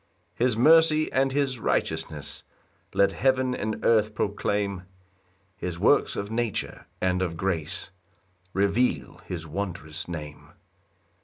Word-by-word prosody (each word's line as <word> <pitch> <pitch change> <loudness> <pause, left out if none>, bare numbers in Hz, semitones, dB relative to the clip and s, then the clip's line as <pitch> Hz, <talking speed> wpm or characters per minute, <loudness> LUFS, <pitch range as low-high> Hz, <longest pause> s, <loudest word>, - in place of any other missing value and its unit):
2 120 - +4
His 120 -4 +2
mercy 155 +3 +5
and 135 0 +2
his 135 -3 0
righteousness - - -2 0.5
Let 100 - +4
heaven 130 -1 +2
and 110 -2 -3
earth 110 -2 +3
proclaim; 100 -2 -1 0.7
His 90 -2 -4
works - - +3
of 100 +1 -4
nature 115 -2 -2
and 90 0 +1
of 85 -3 -2
grace 85 -1 -2 0.6
Reveal 100 - 0
his 85 -2 -5
wondrous 80 -2 -5
name. 75 -4 -8
100 Hz, 115 wpm, -26 LUFS, 90-125 Hz, 0.7 s, mercy